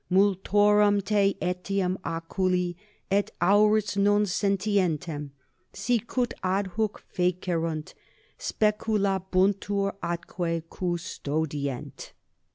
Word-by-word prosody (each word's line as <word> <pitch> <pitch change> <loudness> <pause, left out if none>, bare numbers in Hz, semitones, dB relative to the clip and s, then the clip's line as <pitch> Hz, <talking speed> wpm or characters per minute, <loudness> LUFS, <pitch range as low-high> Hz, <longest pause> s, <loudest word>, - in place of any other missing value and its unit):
Multorum 205 +2 +4
te 200 -1 +2
etiam 180 +1 -1
oculi 175 +2 -1 0.4
et 200 +1 +2
aures 210 +3 +4
non 205 +1 +4
sentientem, 185 -7 0 0.4
sicut 240 +1 -1
adhuc 195 +3 0 0.2
fecerunt, 170 -3 -1 0.4
speculabuntur 200 -2 +1
atque 170 -1 -3
custodient. 155 -6 -3
190 Hz, 65 wpm, -27 LUFS, 175-205 Hz, 0.4 s, Multorum